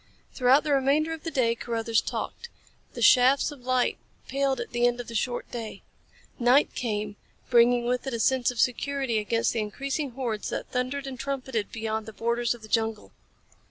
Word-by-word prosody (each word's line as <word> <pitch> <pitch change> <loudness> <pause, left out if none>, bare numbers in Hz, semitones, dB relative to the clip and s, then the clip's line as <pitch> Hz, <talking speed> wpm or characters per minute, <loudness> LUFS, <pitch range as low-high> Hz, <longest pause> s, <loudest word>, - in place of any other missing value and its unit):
Throughout 260 +2 +4
the 305 - -1
remainder 285 +4 +2
of 320 - -7
the 330 - -3
day 255 -6 +2
Carruthers 230 -1 0
talked. 475 - -5 0.4
The - - -3
shafts 260 +3 +5
of 285 -3 -11
light 255 0 +1 0.3
paled 275 -1 0
at 240 - -5
the 240 0 +3
end 245 0 -1
of 245 - -6
the 230 - -8
short 240 +2 -2
day. 225 -4 -6 0.6
Night 250 +4 +4
came, 210 -3 -3 0.3
bringing 240 0 +5
with 250 +2 -1
it 265 - -2
a - - -3
sense 255 +1 +2
of 245 -2 -5
security 255 -1 +1
against 230 +2 0
the 230 - -1
increasing 275 +7 -3
hordes 235 -5 -3
that - - -5
thundered 255 +2 -2
and 260 -2 -7
trumpeted 260 -4 -3
beyond 220 -1 -3
the 220 - -8
borders 235 +2 0
of 235 - -16
the - - -9
jungle. 220 -1 -1
245 Hz, 190 wpm, -27 LUFS, 230-270 Hz, 0.6 s, shafts